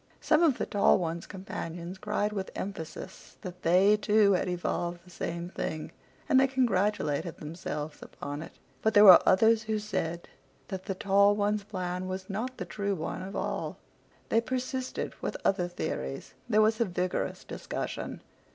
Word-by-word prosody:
Some 310 +1 +3
of 315 -7 +4
the - - -1
tall 205 -3 +4
one's 170 -2 -3
companions 180 -1 -6
cried 210 0 -1
with 195 -2 -3
emphasis 190 -1 -7
that 180 -2 -8
they, 185 +5 +5
too, 210 -1 +4
had 185 -1 +1
evolved 175 -1 -2
the 180 - -16
same 170 0 -4
thing, 155 -3 -4 0.4
and 265 -4 +5
they 270 - +5
congratulated 200 - 0
themselves 150 -1 -6
upon 145 +1 -6
it. 160 - -9 0.3
But 220 - +1
there 205 - +9
were 185 -4 +11
others 220 +4 +5
who 215 0 -1
said 170 -5 -3 0.4
that 190 -1 -5
the 195 - -3
tall 200 +1 +4
one's 205 0 0
plan 185 -2 -4
was 185 +1 -5
not 240 +6 -3
the - - -4
true 200 -1 -2
one 160 - -4
at 190 +2 -7
all. - - -3 0.5
They 225 - +3
persisted 255 +1 -3
with - - -3
other 185 -3 +2
theories. 70 - -4 0.2
There 215 -1 +5
was 220 +1 +2
a - - +4
vigorous 180 -1 -2
discussion. - - -5
195 Hz, 165 wpm, -29 LUFS, 175-210 Hz, 0.5 s, were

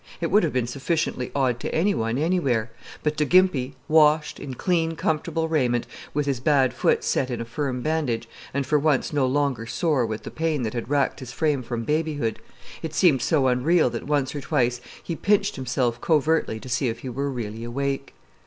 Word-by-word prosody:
It 165 - -2
would 210 +3 +6
have 165 - 0
been 125 -2 0
sufficiently 135 0 -2
odd 130 -4 +1
to - - -4
any 195 +6 +3
one 115 +2 -1
anywhere; 140 -9 +1 0.3
but 150 0 0
to 150 - +2
Gimpy, 150 -6 +3
washed, 155 -1 +4
in 135 -2 -6
clean, 165 +1 0
comfortable 160 +1 -1
raiment, 125 -7 +1 0.3
with 150 0 -1
his 140 -3 -1
bad 130 -2 +3
foot 125 - +1
set 130 - 0
in 120 -2 -3
a 115 - -4
firm 125 0 -3
bandage, 145 -8 -1 0.2
and 140 0 -1
for 150 +3 +2
once 150 -1 +1
no 140 -3 +2
longer 130 -4 0
sore 145 +1 +1
with 110 -1 -5
the - - -7
pain 160 -4 -1
that 110 - -2
had 120 0 -4
racked 145 -1 +1
his 130 -2 -8
frame 150 -4 0
from 120 -1 -4
babyhood, 150 -4 -1 0.4
it 160 -1 -5
seemed 145 -5 +4
so 140 +1 +2
unreal 130 +3 +3
that 115 +3 -5
once 145 -3 0
or 145 - -4
twice 120 -1 0 0.2
he 170 - -3
pinched 205 +4 +1
himself 125 -2 -1
covertly 155 -7 +1
to 130 - -11
see 125 +1 0
if 115 - -5
he 130 - -5
were 140 +3 -2
really 115 -3 -5
awake. 135 +3 -3
140 Hz, 200 wpm, -24 LUFS, 125-155 Hz, 0.4 s, would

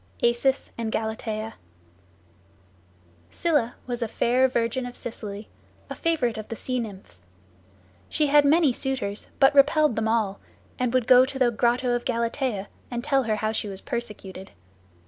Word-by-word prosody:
ACIS 240 +3 +1
AND 225 -1 -2
GALATEA 220 0 -3 1.8
Scylla 290 - 0
was 245 -1 -4
a 230 - 0
fair 250 +4 +2
virgin 245 0 -1
of 245 - -9
Sicily, 210 -3 -7 0.4
a - - -1
favorite 290 -10 0
of 215 - -7
the 230 - -4
Sea 255 +2 -2
Nymphs. 190 - -8 0.9
She 305 - +1
had 290 0 +5
many 295 -1 +4
suitors, 245 -6 -2
but 270 +1 +6
repelled 295 -1 +4
them 220 0 0
all, 220 -3 0 0.4
and 250 -2 +1
would 255 -2 +2
go 250 +1 +7
to 270 0 -5
the 250 -2 +3
grotto 245 +2 +1
of 240 0 -1
Galatea, 235 -3 -1 0.2
and 240 -1 -4
tell 275 -1 +2
her 220 -1 +1
how 215 +1 -1
she 220 - -2
was 195 -1 -5
persecuted. 210 -7 -6
240 Hz, 155 wpm, -25 LUFS, 220-260 Hz, 1.8 s, go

